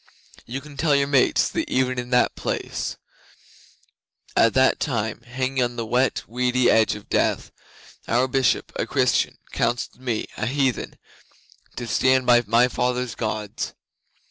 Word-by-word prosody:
You 130 Hz, +4 st, -5 dB
can 145 Hz, 0 st, -13 dB
tell 150 Hz, -1 st, +2 dB
your 140 Hz, 0 st, +3 dB
mates 140 Hz, -2 st, +3 dB
that -, -, -3 dB
even 130 Hz, -1 st, 0 dB
in 125 Hz, 0 st, -5 dB
that 125 Hz, -1 st, +2 dB
place, -, -, -3 dB, 1.4 s
at 115 Hz, -, +4 dB
that 130 Hz, 0 st, +4 dB
time, 115 Hz, -6 st, -2 dB
hanging 130 Hz, +2 st, -2 dB
on 120 Hz, 0 st, -2 dB
the 115 Hz, -1 st, -3 dB
wet, 125 Hz, +1 st, +1 dB
weedy 125 Hz, +1 st, +2 dB
edge 110 Hz, -1 st, +3 dB
of 105 Hz, -, -11 dB
death, -, -, 0 dB, 0.6 s
our 125 Hz, +3 st, +2 dB
Bishop, 130 Hz, -1 st, +1 dB
a -, -, -1 dB
Christian, -, -, +1 dB
counselled 125 Hz, +1 st, -2 dB
me, 120 Hz, -4 st, -2 dB
a 110 Hz, -, -2 dB
heathen, 135 Hz, -1 st, -1 dB, 0.8 s
to 120 Hz, -, -5 dB
stand 130 Hz, +2 st, +2 dB
by 120 Hz, -1 st, +6 dB
my 120 Hz, +2 st, +4 dB
fathers' 125 Hz, -1 st, -1 dB
Gods. 105 Hz, -2 st, -4 dB
125 Hz, 145 wpm, -23 LUFS, 120-130 Hz, 1.4 s, by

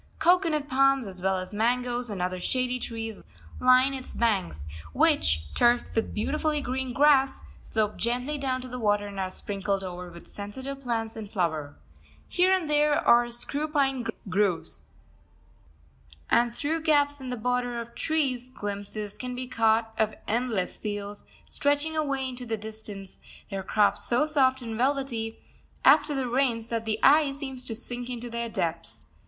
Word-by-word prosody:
Cocoanut 325 Hz, -3 st, +3 dB
palms 275 Hz, -2 st, +3 dB
as 185 Hz, -2 st, -9 dB
well 190 Hz, 0 st, +1 dB
as 185 Hz, +2 st, -6 dB
mangoes 245 Hz, +2 st, 0 dB
and 195 Hz, -4 st, -3 dB
other 185 Hz, 0 st, -2 dB
shady 250 Hz, +5 st, 0 dB
trees 225 Hz, -3 st, -5 dB, 0.4 s
line 255 Hz, +2 st, +5 dB
its 260 Hz, -1 st, -7 dB
banks, 190 Hz, -, 0 dB, 0.3 s
which, 80 Hz, +1 st, +3 dB
turfed 240 Hz, 0 st, +3 dB
with 225 Hz, -, 0 dB
beautifully 300 Hz, +7 st, 0 dB
green 260 Hz, -1 st, -2 dB
grass, 270 Hz, 0 st, +4 dB, 0.2 s
slope 215 Hz, -2 st, -1 dB
gently 250 Hz, +6 st, -1 dB
down 260 Hz, -2 st, -1 dB
to 255 Hz, -, -7 dB
the 250 Hz, 0 st, -6 dB
water, 205 Hz, -2 st, +2 dB
and 200 Hz, -1 st, -6 dB
are 190 Hz, -1 st, -1 dB
sprinkled 195 Hz, 0 st, -3 dB
over 180 Hz, -1 st, -6 dB
with 170 Hz, 0 st, -13 dB
sensitive 260 Hz, +7 st, -6 dB
plants 225 Hz, -3 st, -2 dB
in 220 Hz, -2 st, -6 dB
flower. 160 Hz, -8 st, -2 dB, 0.5 s
Here 365 Hz, +1 st, +3 dB
and 370 Hz, -4 st, +2 dB
there 295 Hz, 0 st, +3 dB
are 240 Hz, 0 st, +6 dB
screwpine 270 Hz, +1 st, 0 dB, 0.2 s
groves, 185 Hz, -, 0 dB, 1.5 s
and 235 Hz, 0 st, +3 dB
through 320 Hz, +5 st, -1 dB
gaps 290 Hz, -2 st, +2 dB
in 260 Hz, -, -5 dB
the 250 Hz, -, -3 dB
border 245 Hz, +1 st, -1 dB
of 235 Hz, 0 st, -7 dB
trees 265 Hz, -6 st, -1 dB
glimpses 205 Hz, -2 st, -5 dB
can 250 Hz, -1 st, -5 dB
be 255 Hz, 0 st, -4 dB
caught 225 Hz, -2 st, +2 dB
of 220 Hz, -1 st, +1 dB
endless 225 Hz, -4 st, -1 dB
fields, 205 Hz, -1 st, -5 dB, 0.2 s
stretching 290 Hz, +2 st, 0 dB
away 275 Hz, -4 st, 0 dB
into 250 Hz, -1 st, -6 dB
the 225 Hz, -1 st, -1 dB
distance, 210 Hz, -2 st, -9 dB, 0.3 s
their 195 Hz, -1 st, -2 dB
crops 205 Hz, +2 st, +2 dB
so 245 Hz, +5 st, +2 dB
soft 265 Hz, -4 st, +2 dB
and 225 Hz, -1 st, -4 dB
velvety 255 Hz, -4 st, 0 dB, 0.5 s
after 295 Hz, -, +6 dB
the 265 Hz, -2 st, -1 dB
rains 240 Hz, -3 st, +1 dB
that 230 Hz, -1 st, -2 dB
the 215 Hz, -1 st, 0 dB
eye 290 Hz, +1 st, +6 dB
seems 265 Hz, -2 st, -5 dB
to 225 Hz, -, -4 dB
sink 245 Hz, +1 st, -6 dB
into 240 Hz, -1 st, -5 dB
their 235 Hz, 0 st, -3 dB
depths. 165 Hz, -, -3 dB
240 Hz, 160 wpm, -27 LUFS, 210-270 Hz, 1.5 s, are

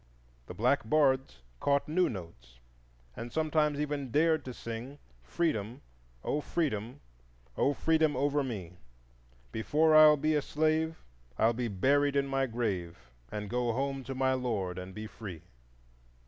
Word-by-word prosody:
The 90 Hz, -, -8 dB
black 120 Hz, +3 st, +1 dB
bards 130 Hz, -, +2 dB, 0.2 s
caught 140 Hz, 0 st, +1 dB
new 180 Hz, +4 st, +2 dB
notes, 65 Hz, -, -10 dB, 0.6 s
and 120 Hz, +1 st, -7 dB
sometimes 155 Hz, 0 st, +1 dB
even 145 Hz, -2 st, -2 dB
dared 155 Hz, +3 st, +2 dB
to 130 Hz, -, -5 dB
sing,— 120 Hz, +4 st, -7 dB, 0.2 s
"O -, -, -31 dB
Freedom, 125 Hz, -6 st, -1 dB, 0.4 s
O 150 Hz, -, -1 dB
Freedom, 125 Hz, -9 st, -2 dB, 0.6 s
O 140 Hz, -, +2 dB
Freedom 160 Hz, -2 st, +2 dB
over 145 Hz, +2 st, +1 dB
me! 95 Hz, -9 st, -6 dB, 0.7 s
Before 155 Hz, +8 st, +2 dB
I'll 155 Hz, -1 st, +8 dB
be 155 Hz, +2 st, +1 dB
a 150 Hz, -, +2 dB
slave 155 Hz, +2 st, 0 dB, 0.3 s
I'll 115 Hz, +1 st, +3 dB
be 120 Hz, +1 st, -2 dB
buried 140 Hz, +8 st, +2 dB
in 140 Hz, 0 st, +2 dB
my 135 Hz, -1 st, 0 dB
grave, 95 Hz, -, -4 dB, 0.2 s
And 105 Hz, 0 st, -4 dB
go 120 Hz, +2 st, 0 dB
home 135 Hz, +2 st, -2 dB
to 135 Hz, -, -5 dB
my 130 Hz, 0 st, +2 dB
Lord 105 Hz, -8 st, -2 dB
And 90 Hz, +1 st, -9 dB
be 110 Hz, -, -6 dB
free." 95 Hz, -6 st, -9 dB
130 Hz, 145 wpm, -31 LUFS, 110-150 Hz, 0.7 s, I'll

